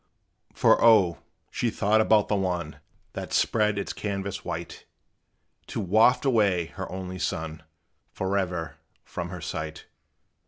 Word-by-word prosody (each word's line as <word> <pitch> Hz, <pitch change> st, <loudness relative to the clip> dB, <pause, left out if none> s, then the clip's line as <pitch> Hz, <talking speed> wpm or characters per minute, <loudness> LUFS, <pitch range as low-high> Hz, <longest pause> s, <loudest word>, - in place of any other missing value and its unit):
For, -, -, +4 dB
O! 95 Hz, -9 st, +5 dB, 0.3 s
she 120 Hz, -, 0 dB
thought 110 Hz, 0 st, +2 dB
about 110 Hz, -1 st, +4 dB
the 105 Hz, -, +1 dB
one 90 Hz, -5 st, -2 dB, 0.3 s
That -, -, -6 dB
spread 105 Hz, -2 st, +2 dB
its 100 Hz, -, -3 dB
canvass 100 Hz, -1 st, -4 dB
white, 85 Hz, -1 st, -6 dB, 0.8 s
To -, -, -4 dB
waft 110 Hz, +7 st, +4 dB
away 100 Hz, -9 st, +3 dB
her 95 Hz, -2 st, -6 dB
only 95 Hz, 0 st, -6 dB
son 80 Hz, -2 st, -3 dB, 0.5 s
Forever 90 Hz, -5 st, -2 dB, 0.3 s
from 85 Hz, 0 st, -5 dB
her 90 Hz, -1 st, -7 dB
sight! 80 Hz, 0 st, -5 dB
95 Hz, 125 wpm, -26 LUFS, 85-105 Hz, 0.8 s, O